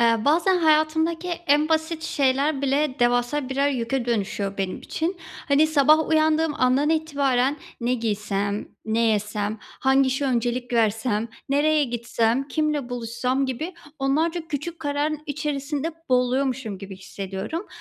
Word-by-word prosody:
Eee, 230 -1 +3
bazen 340 +6 +3
hayatımdaki 320 +2 +2 0.2
en 295 +2 +4
basit 320 0 0
şeyler 280 -1 +1
bile 280 0 +1
devasa 245 +3 +1
birer 275 +2 +1
yüke 255 -1 -1
dönüşüyor 200 -3 -2
benim 190 -1 -2
için. 340 +4 -3 0.3
Hani, 290 +2 +5
sabah 310 +1 +4
uyandığım 315 0 +2
andan 260 +4 +3
itibaren 285 -4 +1 0.2
"Ne 240 +2 +1
giysem? 205 -3 -2 0.2
Ne 220 +1 0
yesem? 215 -1 0
Hangi 270 0 +1
işe 265 +2 0
öncelik 245 -1 -1
versem? 225 0 +1 0.2
Nereye 295 +2 +3
gitsem? 235 +1 0
Kiminle 300 -5 -1
buluşsam?" 245 +2 -1
gibi 310 +8 -4 0.2
onlarca 320 +5 0
küçük 330 +2 -4
kararın 295 +1 -1
içerisinde 295 +1 -3 0.2
boğuluyormuşum 250 -3 0
gibi 195 0 -9
hissediyorum. 195 - -5
270 Hz, 130 wpm, -24 LUFS, 235-305 Hz, 0.3 s, Hani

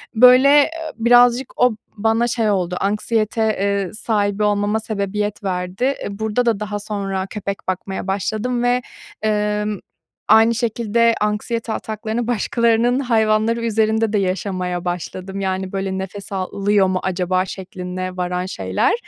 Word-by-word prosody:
böyle, 250 +4 +7
eee, 290 +1 +6 0.3
birazcık 245 +2 +4
o 250 -3 +4 0.2
bana 225 +3 +2
şey 230 -2 0
oldu, 180 -3 0
anksiyete, 215 +2 0 0.2
eee, 200 -2 0
sahibi 210 -2 0
olmama 205 +1 +1
sebebiyet 210 -1 -3
verdi. 180 +2 -3
Eee, 275 +2 0
burada 220 +3 0
da 225 -3 +1
daha 205 -1 -3
sonra 195 -2 -3
köpek 200 -2 -4
bakmaya 190 +1 -3
başladım 220 +5 -1
ve, 245 +1 +2 0.4
ımm, 210 -1 0 0.5
aynı 225 +2 +5
şekilde 230 0 +1
anksiyete 220 +2 -1
ataklarını 220 +2 -3
başkalarının 235 +2 +2
hayvanları 225 -1 +1
üzerinde 220 0 +1
de - - +3
yaşamaya 185 -1 -2
başladım. 185 +2 -4
Yani, 190 -1 -2
böyle, 195 -1 -2
"Nefes 195 +1 -6
alıyor 195 +1 +1
mu 185 0 0
acaba?" 185 0 0
şekline 185 -1 -6
varan 180 0 -2
şeyler. 95 - 0
210 Hz, 130 wpm, -20 LUFS, 190-230 Hz, 0.5 s, böyle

